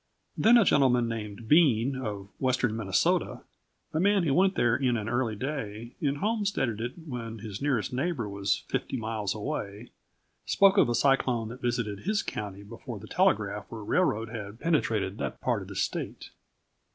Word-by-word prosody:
Then 235 Hz, +2 st, +6 dB
a 230 Hz, -, +5 dB
gentleman 125 Hz, -6 st, +4 dB
named 110 Hz, -1 st, -5 dB
Bean, 135 Hz, -4 st, +4 dB
of 105 Hz, -6 st, -5 dB
western 125 Hz, -4 st, +1 dB
Minnesota, 100 Hz, -4 st, +1 dB, 0.5 s
a 155 Hz, -, +1 dB
man 200 Hz, +1 st, +3 dB
who 145 Hz, -5 st, +1 dB
went 190 Hz, +5 st, +3 dB
there 120 Hz, -1 st, +3 dB
in 125 Hz, -2 st, +1 dB
an 105 Hz, -1 st, -4 dB
early 120 Hz, -1 st, 0 dB
day 115 Hz, -3 st, -5 dB
and 145 Hz, -1 st, 0 dB
homesteaded 200 Hz, -, -1 dB
it 120 Hz, +2 st, -3 dB
when 115 Hz, -5 st, -5 dB
his 105 Hz, 0 st, -7 dB
nearest 130 Hz, -7 st, 0 dB
neighbor 130 Hz, -3 st, -1 dB
was 100 Hz, -1 st, -1 dB
fifty -, -, -2 dB
miles 110 Hz, -4 st, -2 dB
away, 105 Hz, -2 st, -5 dB, 0.5 s
spoke 195 Hz, 0 st, +4 dB
of -, -, +4 dB
a 120 Hz, -, +1 dB
cyclone 125 Hz, -3 st, +2 dB
that 125 Hz, +3 st, -9 dB
visited 115 Hz, -5 st, -1 dB
his 210 Hz, +2 st, 0 dB
county 100 Hz, -1 st, -5 dB
before 115 Hz, +2 st, -8 dB
the 100 Hz, -, -10 dB
telegraph 105 Hz, -, +1 dB
or 110 Hz, -2 st, -6 dB
railroad 115 Hz, -, +1 dB
had 110 Hz, -1 st, -7 dB
penetrated 110 Hz, -, 0 dB
that -, -, -4 dB
part -, -, 0 dB
of -, -, -9 dB
the -, -, -9 dB
state. -, -, -3 dB
120 Hz, 170 wpm, -28 LUFS, 105-140 Hz, 0.5 s, Then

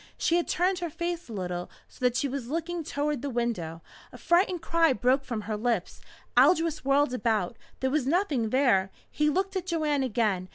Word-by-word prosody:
She 340 Hz, -, +2 dB
had 345 Hz, -, 0 dB
turned 365 Hz, +2 st, +1 dB
her 345 Hz, -1 st, -3 dB
face 345 Hz, 0 st, -4 dB
a -, -, -7 dB
little, 180 Hz, -3 st, -4 dB, 0.2 s
so -, -, -14 dB
that 250 Hz, -1 st, +3 dB
she 280 Hz, -, +1 dB
was 270 Hz, -3 st, -4 dB
looking 335 Hz, +2 st, -3 dB
toward 290 Hz, -2 st, -2 dB
the 285 Hz, -, -3 dB
window. 220 Hz, -10 st, -3 dB, 0.3 s
A -, -, -11 dB
frightened 350 Hz, -1 st, +2 dB
cry 330 Hz, -4 st, +3 dB
broke 255 Hz, +4 st, +2 dB
from 235 Hz, -5 st, -4 dB
her 210 Hz, +1 st, -3 dB
lips. 220 Hz, -3 st, -2 dB, 0.3 s
Aldous 330 Hz, -3 st, +4 dB
whirled 275 Hz, 0 st, +2 dB
about. 225 Hz, -5 st, 0 dB, 0.3 s
There 260 Hz, 0 st, +1 dB
was 285 Hz, -3 st, 0 dB
nothing 290 Hz, -, +1 dB
there. 230 Hz, -7 st, +3 dB, 0.2 s
He 300 Hz, 0 st, +2 dB
looked 380 Hz, +5 st, -1 dB
at 370 Hz, -1 st, -3 dB
Joanne 305 Hz, -5 st, 0 dB
again. 210 Hz, -7 st, 0 dB
275 Hz, 195 wpm, -28 LUFS, 230-330 Hz, 0.3 s, Aldous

